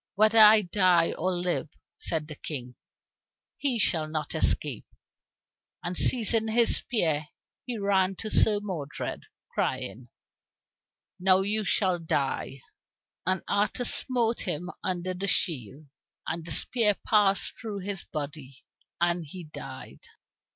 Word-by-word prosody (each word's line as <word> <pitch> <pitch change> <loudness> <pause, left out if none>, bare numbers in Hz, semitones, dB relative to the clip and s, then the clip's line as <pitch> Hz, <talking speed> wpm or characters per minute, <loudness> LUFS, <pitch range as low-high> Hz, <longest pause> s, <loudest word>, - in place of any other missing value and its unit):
"Whether 215 +2 +4
I 215 0 +8
die 180 -2 +3
or 185 +3 -1
live," 175 -3 -1 0.3
said 155 -2 -2
the 155 - -7
King, 130 -4 -6 0.8
"he 270 -4 +1
shall 165 -7 +1
not 155 -1 -4
escape." 150 -5 +1 1.0
And 175 +1 -3
seizing 225 -1 +2
his 230 +1 +3
spear 160 - 0 0.4
he 245 -2 -3
ran 195 -2 +1
to 215 +3 -6
Sir 210 -1 +5
Modred, 160 -8 -5 0.3
crying, 120 +1 -3 1.1
"Now 185 +1 +4
you 210 +2 -1
shall 185 -3 +1
die." 140 -4 -2 0.7
And 185 0 +1
Arthur 210 +4 0
smote 235 -2 +1
him 180 +1 -2
under 185 0 -2
the 190 +2 -4
shield, 145 - 0 0.4
and 165 +1 -3
the 165 - -8
spear 210 - +2
passed 205 -2 +3
through 210 -4 -5
his 195 0 -4
body, 145 -3 -7 0.4
and 175 0 +1
he 175 +4 -9
died. 155 - -10
185 Hz, 125 wpm, -27 LUFS, 155-210 Hz, 1.1 s, I